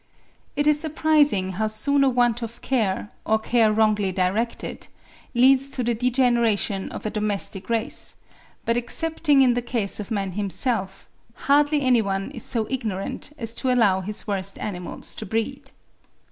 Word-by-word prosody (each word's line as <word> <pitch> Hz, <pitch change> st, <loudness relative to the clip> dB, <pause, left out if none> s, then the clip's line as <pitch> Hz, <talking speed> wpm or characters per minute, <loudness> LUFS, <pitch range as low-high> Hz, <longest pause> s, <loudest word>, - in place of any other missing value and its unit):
It 290 Hz, +1 st, +1 dB
is 300 Hz, 0 st, +4 dB
surprising 295 Hz, -, +2 dB
how 215 Hz, +4 st, -1 dB
soon 275 Hz, +7 st, +1 dB
a 270 Hz, -, +4 dB
want 245 Hz, -2 st, +1 dB
of 230 Hz, +1 st, -7 dB
care, 210 Hz, -6 st, -1 dB
or 220 Hz, -, +2 dB
care 220 Hz, 0 st, +2 dB
wrongly 210 Hz, -2 st, +2 dB
directed, 190 Hz, +6 st, -2 dB, 0.5 s
leads 265 Hz, +2 st, +4 dB
to 265 Hz, -2 st, -3 dB
the 240 Hz, 0 st, +1 dB
degeneration 235 Hz, -5 st, +1 dB
of -, -, -8 dB
a 215 Hz, -, -2 dB
domestic 210 Hz, -2 st, -2 dB
race; 230 Hz, 0 st, -1 dB, 0.5 s
but 230 Hz, +1 st, +1 dB
excepting 295 Hz, +2 st, +2 dB
in 250 Hz, -2 st, +4 dB
the 245 Hz, -, -1 dB
case 235 Hz, -5 st, -1 dB
of 210 Hz, -, -6 dB
man 200 Hz, -4 st, -2 dB
himself, 195 Hz, 0 st, +1 dB, 0.4 s
hardly 290 Hz, +1 st, +3 dB
any 250 Hz, -3 st, +4 dB
one 195 Hz, -1 st, -3 dB
is -, -, -6 dB
so 230 Hz, -4 st, -1 dB
ignorant 215 Hz, -1 st, -4 dB
as 230 Hz, -3 st, -4 dB
to 255 Hz, +1 st, 0 dB
allow 205 Hz, -7 st, +3 dB
his 210 Hz, +3 st, -4 dB
worst 195 Hz, -2 st, 0 dB
animals 180 Hz, -4 st, -5 dB
to 220 Hz, -, -5 dB
breed. 225 Hz, +6 st, -3 dB
230 Hz, 160 wpm, -23 LUFS, 205-260 Hz, 0.5 s, is